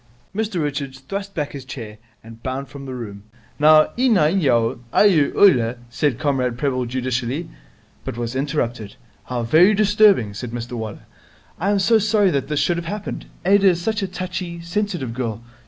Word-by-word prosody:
Mr 210 Hz, -4 st, -1 dB
Richards 140 Hz, -2 st, -4 dB
thrust 195 Hz, +5 st, -6 dB
back 150 Hz, -2 st, -2 dB
his 140 Hz, -2 st, -8 dB
chair 115 Hz, -6 st, -8 dB, 0.2 s
and 115 Hz, 0 st, -13 dB
bounded 130 Hz, +2 st, -4 dB
from 140 Hz, -1 st, -9 dB
the 130 Hz, -, -5 dB
room. 105 Hz, -5 st, -7 dB, 0.4 s
'Now, 155 Hz, +1 st, +6 dB
iawinyaw, 150 Hz, -, +3 dB
iear 170 Hz, -9 st, +4 dB
oiler 125 Hz, -, +5 dB
' -, -, -25 dB
said 145 Hz, -6 st, +2 dB
Comrade 130 Hz, -5 st, 0 dB
Prebble 130 Hz, -2 st, -1 dB
judicially, 130 Hz, +4 st, -2 dB, 0.6 s
but -, -, -6 dB
was 120 Hz, +1 st, -4 dB
interrupted. 125 Hz, -6 st, -2 dB, 0.3 s
'How 125 Hz, -2 st, -3 dB
very 170 Hz, -, +5 dB
disturbing!' 205 Hz, -, +4 dB
said 115 Hz, +4 st, -6 dB
Mr 120 Hz, 0 st, -6 dB
Waller. 110 Hz, -4 st, -6 dB, 0.5 s
'I 195 Hz, -, 0 dB
am 205 Hz, -, +3 dB
so 220 Hz, +4 st, +4 dB
sorry 205 Hz, -2 st, +3 dB
that 140 Hz, -2 st, -1 dB
this 150 Hz, -1 st, -1 dB
should 175 Hz, -, +1 dB
have 170 Hz, -1 st, -5 dB
happened. 205 Hz, +2 st, -5 dB, 0.2 s
Ada 200 Hz, +1 st, +5 dB
is 175 Hz, -2 st, +3 dB
such 220 Hz, +1 st, -1 dB
a 195 Hz, -, -1 dB
touchy, 180 Hz, -1 st, -5 dB
sensitive 175 Hz, -, -3 dB
girl. 115 Hz, -3 st, -4 dB
145 Hz, 170 wpm, -21 LUFS, 120-190 Hz, 0.6 s, Now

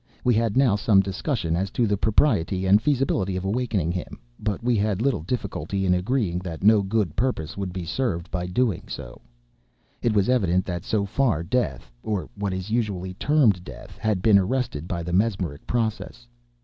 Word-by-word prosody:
We 125 Hz, -, +3 dB
had 115 Hz, 0 st, +1 dB
now 130 Hz, -6 st, +4 dB
some 100 Hz, -1 st, +4 dB
discussion 95 Hz, -, -2 dB
as 95 Hz, +3 st, -1 dB
to 120 Hz, -, +3 dB
the 105 Hz, -2 st, +1 dB
propriety 100 Hz, -, +1 dB
and 100 Hz, +3 st, +5 dB
feasibility 125 Hz, -9 st, +1 dB
of 95 Hz, +1 st, -3 dB
awakening 100 Hz, -5 st, 0 dB
him; 90 Hz, 0 st, -5 dB, 0.2 s
but 105 Hz, +1 st, -3 dB
we 120 Hz, 0 st, +2 dB
had 105 Hz, -2 st, 0 dB
little 130 Hz, -, +1 dB
difficulty 100 Hz, 0 st, -3 dB
in 90 Hz, -, +3 dB
agreeing 90 Hz, -1 st, 0 dB
that 90 Hz, -2 st, -7 dB
no 105 Hz, 0 st, +6 dB
good 100 Hz, -4 st, -1 dB
purpose 115 Hz, -, -1 dB
would 95 Hz, -2 st, -4 dB
be 90 Hz, -1 st, -5 dB
served 85 Hz, -4 st, -2 dB
by 90 Hz, -1 st, -2 dB
so -, -, -8 dB
doing. 110 Hz, -3 st, 0 dB, 1.1 s
It 115 Hz, -3 st, +1 dB
was 100 Hz, -2 st, +3 dB
evident 95 Hz, -8 st, +2 dB
that, 85 Hz, -2 st, -4 dB
so 105 Hz, -2 st, 0 dB
far, 110 Hz, -, +1 dB
death 85 Hz, -, -2 dB
(or 105 Hz, -4 st, -3 dB
what 100 Hz, -1 st, -3 dB
is 95 Hz, +2 st, -4 dB
usually 100 Hz, -6 st, -1 dB
termed 115 Hz, -, +2 dB
death) -, -, -11 dB
had 105 Hz, -4 st, 0 dB
been 105 Hz, -3 st, +6 dB
arrested 100 Hz, -, -2 dB
by 85 Hz, -2 st, -3 dB
the 85 Hz, +1 st, -4 dB
mesmeric 95 Hz, -7 st, 0 dB
process. 120 Hz, +1 st, -2 dB
100 Hz, 185 wpm, -24 LUFS, 90-115 Hz, 1.1 s, no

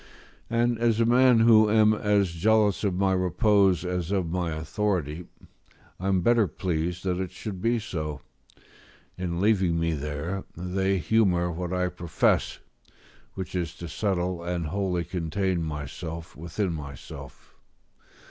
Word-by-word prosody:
And 120 Hz, 0 st, +1 dB
as 115 Hz, -1 st, +2 dB
a 115 Hz, -, +4 dB
man 125 Hz, 0 st, +5 dB
who 110 Hz, -2 st, +6 dB
am 110 Hz, 0 st, +5 dB
as 105 Hz, -3 st, +1 dB
jealous 105 Hz, +4 st, +2 dB
of 100 Hz, -3 st, 0 dB
my 95 Hz, +1 st, +2 dB
repose 95 Hz, 0 st, +2 dB
as 90 Hz, -1 st, -2 dB
of 95 Hz, -4 st, -1 dB
my 90 Hz, -1 st, -1 dB
authority, 85 Hz, -1 st, -2 dB, 0.7 s
I 95 Hz, -, -3 dB
am 95 Hz, -2 st, +2 dB
better 115 Hz, +1 st, +3 dB
pleased 85 Hz, 0 st, -3 dB
that 90 Hz, -1 st, -1 dB
it 95 Hz, -1 st, -2 dB
should 95 Hz, -2 st, -7 dB
be 115 Hz, +1 st, +2 dB
so; 75 Hz, -, -4 dB, 1.0 s
in 90 Hz, -2 st, -3 dB
leaving 95 Hz, -5 st, +2 dB
me 85 Hz, 0 st, 0 dB
there, 75 Hz, +6 st, -4 dB
they 95 Hz, +2 st, 0 dB
humour 90 Hz, -3 st, +2 dB
what 90 Hz, +1 st, -4 dB
I 90 Hz, 0 st, 0 dB
profess, 85 Hz, -2 st, 0 dB, 0.8 s
which 95 Hz, -2 st, -6 dB
is 85 Hz, -2 st, -3 dB
to 85 Hz, 0 st, -7 dB
settle 90 Hz, 0 st, -1 dB
and 85 Hz, -1 st, -2 dB
wholly 90 Hz, +1 st, -1 dB
contain 90 Hz, +1 st, -1 dB
myself 80 Hz, +2 st, -6 dB
within 85 Hz, +4 st, -3 dB
myself. 70 Hz, -5 st, -9 dB
90 Hz, 140 wpm, -26 LUFS, 85-105 Hz, 1.0 s, who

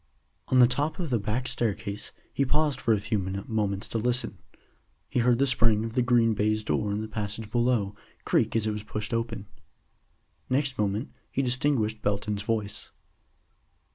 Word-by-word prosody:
On 130 Hz, -, +3 dB
the 125 Hz, -, +9 dB
top 145 Hz, +5 st, 0 dB
of 170 Hz, -6 st, -3 dB
the 120 Hz, -, +2 dB
back 110 Hz, +5 st, -2 dB
staircase 105 Hz, -3 st, -2 dB, 0.2 s
he 140 Hz, -, +2 dB
paused 145 Hz, 0 st, +1 dB
for 115 Hz, -, +2 dB
a 110 Hz, -, +4 dB
few 105 Hz, +1 st, -1 dB
moments 100 Hz, +1 st, -2 dB
to 115 Hz, -, -1 dB
listen. 125 Hz, +2 st, +1 dB, 0.7 s
He -, -, -1 dB
heard 120 Hz, 0 st, +4 dB
the 140 Hz, -, +3 dB
spring 115 Hz, -4 st, +3 dB
of 115 Hz, -, -5 dB
the 125 Hz, -, +2 dB
green 120 Hz, -2 st, +4 dB
baize 110 Hz, +1 st, +1 dB
door 105 Hz, -1 st, 0 dB
in 105 Hz, +1 st, -1 dB
the 110 Hz, -, -4 dB
passage 110 Hz, 0 st, -4 dB
below 120 Hz, -4 st, +1 dB, 0.3 s
creak -, -, +2 dB
as 110 Hz, -1 st, +2 dB
it 110 Hz, -, +1 dB
was 105 Hz, 0 st, -3 dB
pushed 105 Hz, +1 st, -5 dB
open. 115 Hz, -3 st, -2 dB, 1.0 s
Next 135 Hz, -1 st, +1 dB
moment 105 Hz, +4 st, 0 dB, 0.2 s
he 135 Hz, -, 0 dB
distinguished 125 Hz, -4 st, +1 dB
Belton's 100 Hz, 0 st, -1 dB
voice. 105 Hz, -1 st, -3 dB
110 Hz, 170 wpm, -27 LUFS, 105-125 Hz, 1.0 s, the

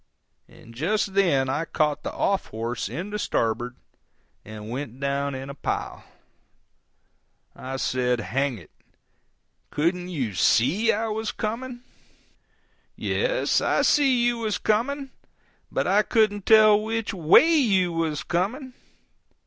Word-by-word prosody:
And 115 Hz, -, -16 dB
just 190 Hz, -, -1 dB
then 170 Hz, -10 st, +2 dB
I 140 Hz, +5 st, -1 dB
caught 150 Hz, -2 st, -1 dB
the -, -, -5 dB
off 195 Hz, -1 st, -1 dB
horse 115 Hz, -1 st, -4 dB
in 175 Hz, -, -5 dB
the 210 Hz, -, -3 dB
starboard 120 Hz, -, -1 dB, 0.7 s
and 110 Hz, +1 st, -9 dB
went 125 Hz, -1 st, -6 dB
down 140 Hz, 0 st, -1 dB
in 130 Hz, +1 st, -6 dB
a 140 Hz, -, -7 dB
pile. 140 Hz, -, -4 dB, 1.5 s
I 135 Hz, +1 st, -6 dB
said, 125 Hz, -2 st, 0 dB
"Hang 135 Hz, +1 st, -1 dB
it! 85 Hz, -6 st, -15 dB, 1.0 s
Couldn't 175 Hz, +4 st, -1 dB
you 130 Hz, -, -3 dB
SEE 140 Hz, -, +3 dB
I 225 Hz, +2 st, -1 dB
was 220 Hz, 0 st, -3 dB
coming?" 240 Hz, +3 st, -5 dB, 1.1 s
"Yes, -, -, 0 dB
I -, -, +1 dB
see 265 Hz, -5 st, +3 dB
you 240 Hz, -1 st, +1 dB
was 220 Hz, -2 st, -1 dB
coming, 265 Hz, +6 st, -1 dB, 0.6 s
but -, -, -1 dB
I 200 Hz, +3 st, +4 dB
couldn't 215 Hz, -2 st, +1 dB
tell 215 Hz, -1 st, +6 dB
which 225 Hz, 0 st, -3 dB
WAY 190 Hz, -, +5 dB
you 195 Hz, -, +2 dB
was 160 Hz, -2 st, -2 dB
coming. 240 Hz, -, -2 dB
180 Hz, 130 wpm, -24 LUFS, 135-220 Hz, 1.5 s, tell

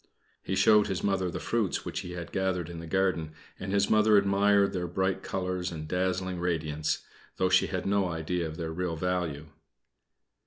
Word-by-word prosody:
He -, -, -2 dB
showed 105 Hz, -1 st, +5 dB
his 95 Hz, -3 st, -3 dB
Mother 95 Hz, -2 st, +1 dB
the -, -, -4 dB
fruits 115 Hz, -5 st, -1 dB
which -, -, -3 dB
he 90 Hz, -, -6 dB
had 85 Hz, -1 st, -6 dB
gathered 90 Hz, -3 st, -1 dB
in 85 Hz, -, -7 dB
the 85 Hz, -, -8 dB
garden, 85 Hz, -3 st, 0 dB, 0.3 s
and 95 Hz, +1 st, -4 dB
his 100 Hz, 0 st, +3 dB
Mother 110 Hz, -1 st, +5 dB
admired 100 Hz, 0 st, +3 dB
their 90 Hz, -1 st, -2 dB
bright 95 Hz, +2 st, -1 dB
colors 90 Hz, -1 st, -2 dB
and 75 Hz, -2 st, -6 dB
dazzling 95 Hz, +1 st, -1 dB
radiance, 80 Hz, -3 st, -1 dB, 0.3 s
though 95 Hz, -, +2 dB
she 95 Hz, 0 st, +4 dB
had 95 Hz, -1 st, -3 dB
no 100 Hz, -1 st, +2 dB
idea 85 Hz, +1 st, -2 dB
of 80 Hz, -, -7 dB
their 80 Hz, -2 st, -3 dB
real 90 Hz, -1 st, -2 dB
value. 80 Hz, -3 st, -2 dB
90 Hz, 185 wpm, -29 LUFS, 85-95 Hz, 0.3 s, showed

